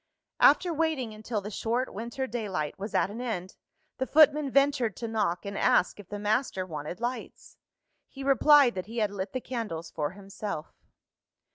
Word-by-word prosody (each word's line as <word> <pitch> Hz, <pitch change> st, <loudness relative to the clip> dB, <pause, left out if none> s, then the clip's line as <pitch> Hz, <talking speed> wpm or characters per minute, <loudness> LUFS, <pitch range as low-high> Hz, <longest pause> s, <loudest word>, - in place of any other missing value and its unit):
After 335 Hz, +4 st, +5 dB
waiting 305 Hz, -8 st, -1 dB
until 215 Hz, 0 st, -4 dB
the 210 Hz, +2 st, -7 dB
short 235 Hz, +5 st, -1 dB
winter 235 Hz, +5 st, -4 dB
daylight 200 Hz, -, -3 dB
was 200 Hz, +2 st, -5 dB
at 195 Hz, -, +2 dB
an 225 Hz, +4 st, -6 dB
end, 190 Hz, -7 st, -4 dB, 0.4 s
the 260 Hz, -, -1 dB
footman 300 Hz, -2 st, +5 dB
ventured 275 Hz, -5 st, +2 dB
to 230 Hz, -, -4 dB
knock, 210 Hz, -6 st, -1 dB
and 200 Hz, 0 st, -5 dB
ask 185 Hz, -, +2 dB
if 200 Hz, -, -12 dB
the 205 Hz, -, -4 dB
master 205 Hz, -2 st, 0 dB
wanted 155 Hz, +1 st, -6 dB
lights. 245 Hz, +2 st, -5 dB, 0.5 s
He 275 Hz, -, -9 dB
replied 275 Hz, -1 st, +6 dB
that 185 Hz, +1 st, -5 dB
he 230 Hz, +2 st, -8 dB
had 210 Hz, -3 st, +1 dB
lit 195 Hz, -1 st, -4 dB
the 255 Hz, -, -2 dB
candles 215 Hz, -11 st, -5 dB
for 150 Hz, +1 st, -2 dB
himself. 195 Hz, -4 st, -6 dB
220 Hz, 170 wpm, -28 LUFS, 195-260 Hz, 0.5 s, replied